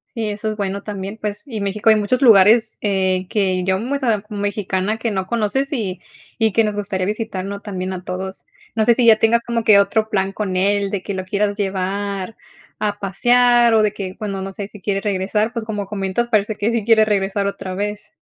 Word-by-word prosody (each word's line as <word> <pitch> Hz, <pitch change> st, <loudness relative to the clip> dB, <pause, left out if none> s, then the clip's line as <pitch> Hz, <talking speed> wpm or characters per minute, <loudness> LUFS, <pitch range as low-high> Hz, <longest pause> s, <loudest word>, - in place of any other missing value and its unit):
Sí, 225 Hz, -2 st, -2 dB
eso 210 Hz, +1 st, -3 dB
es 215 Hz, -, -4 dB
bueno 200 Hz, -1 st, -2 dB
también, 200 Hz, 0 st, -6 dB
pues, 210 Hz, +3 st, -4 dB
y 225 Hz, -6 st, -5 dB
México 200 Hz, +2 st, +1 dB
hay -, -, +6 dB
muchos 215 Hz, +6 st, 0 dB
lugares, 220 Hz, 0 st, +6 dB
eh, 190 Hz, -2 st, 0 dB
que, 185 Hz, -3 st, 0 dB
yo 190 Hz, +1 st, +1 dB
m 245 Hz, +8 st, -2 dB
o -, -, -2 dB
sea, 225 Hz, -6 st, 0 dB
mexicana, 205 Hz, 0 st, -2 dB
que 225 Hz, 0 st, -2 dB
no 190 Hz, -2 st, -2 dB
conoces 235 Hz, +5 st, -1 dB
y 195 Hz, -, -3 dB, 0.4 s
y 220 Hz, -1 st, +3 dB
que 225 Hz, -, +3 dB
nos 210 Hz, -1 st, -1 dB
gustaría 200 Hz, -2 st, -2 dB
visitar, 210 Hz, -2 st, -3 dB
¿no?, 200 Hz, 0 st, -5 dB
también 190 Hz, -3 st, -4 dB
a 180 Hz, -1 st, -7 dB
todos, 190 Hz, +1 st, -6 dB, 0.3 s
no 220 Hz, -1 st, +1 dB
sé, 235 Hz, -, +5 dB
si 245 Hz, -, +2 dB
ya 225 Hz, -2 st, +7 dB
tengas 235 Hz, +1 st, +3 dB
como 235 Hz, -1 st, -2 dB
que 215 Hz, -2 st, +6 dB
otro 215 Hz, +2 st, +1 dB
plan 195 Hz, -2 st, 0 dB
con 195 Hz, -3 st, -2 dB
él, 200 Hz, +1 st, +1 dB
de 195 Hz, -2 st, -3 dB
que 200 Hz, -, -4 dB
lo 185 Hz, -1 st, -4 dB
quieras 205 Hz, +1 st, 0 dB
llevar 195 Hz, +1 st, -3 dB, 0.4 s
a 205 Hz, -1 st, -1 dB
pasear 240 Hz, +4 st, +3 dB
o 215 Hz, -, +4 dB
de 210 Hz, -1 st, +1 dB
que, 190 Hz, -3 st, -6 dB
bueno, 195 Hz, -3 st, -4 dB
no 195 Hz, 0 st, -5 dB
sé, 195 Hz, +1 st, -6 dB
si 210 Hz, -1 st, -10 dB
quiere 195 Hz, 0 st, -1 dB
regresar, 210 Hz, +3 st, -1 dB
pues, 230 Hz, -, -3 dB
como 210 Hz, -2 st, -3 dB
comentas 195 Hz, +3 st, -2 dB
parece 215 Hz, -2 st, +1 dB
que 210 Hz, +3 st, 0 dB
sí 230 Hz, -2 st, 0 dB
quiere 220 Hz, 0 st, +5 dB
regresar 200 Hz, -1 st, 0 dB
otra 190 Hz, -2 st, -4 dB
vez. 210 Hz, +1 st, -4 dB
205 Hz, 225 wpm, -20 LUFS, 195-220 Hz, 0.4 s, ya